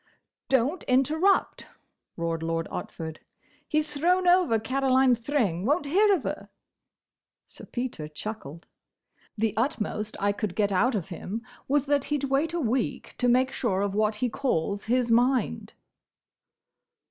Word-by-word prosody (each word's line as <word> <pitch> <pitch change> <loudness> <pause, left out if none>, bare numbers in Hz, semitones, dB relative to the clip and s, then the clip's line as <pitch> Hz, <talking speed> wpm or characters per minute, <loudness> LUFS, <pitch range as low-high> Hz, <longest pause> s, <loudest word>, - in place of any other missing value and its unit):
"Don't 270 +6 +2
interrupt!" 310 +10 +2 0.5
roared 165 -1 -2
Lord 165 0 -2
Otford. 160 -1 -6 0.5
"He's 305 0 0
thrown 360 +5 +2
over 355 -10 +4
Caroline 260 +2 +3
Thring—won't 240 - 0
hear 400 +8 +4
of 330 - -4
her." - - -5 1.0
Sir - - -12
Peter 240 -11 -4
chuckled. 165 -1 -7 0.7
"The 215 -1 +1
utmost 215 -3 -2
I 200 0 +2
could 205 -2 -4
get 205 -2 +1
out 220 +7 +2
of 195 -3 -3
him 200 +6 -5 0.2
was 285 0 +2
that 285 -1 +1
he 295 - 0
'd 285 - -7
wait 290 +4 +2
a 345 - -2
week 250 -3 -1
to 245 - +2
make 255 +2 +3
sure 195 -6 -1
of 200 -1 -1
what 215 +1 +1
he 245 +4 0
calls 205 - -1
his 240 +1 +1
mind." 245 - +1
245 Hz, 140 wpm, -27 LUFS, 205-280 Hz, 1.0 s, over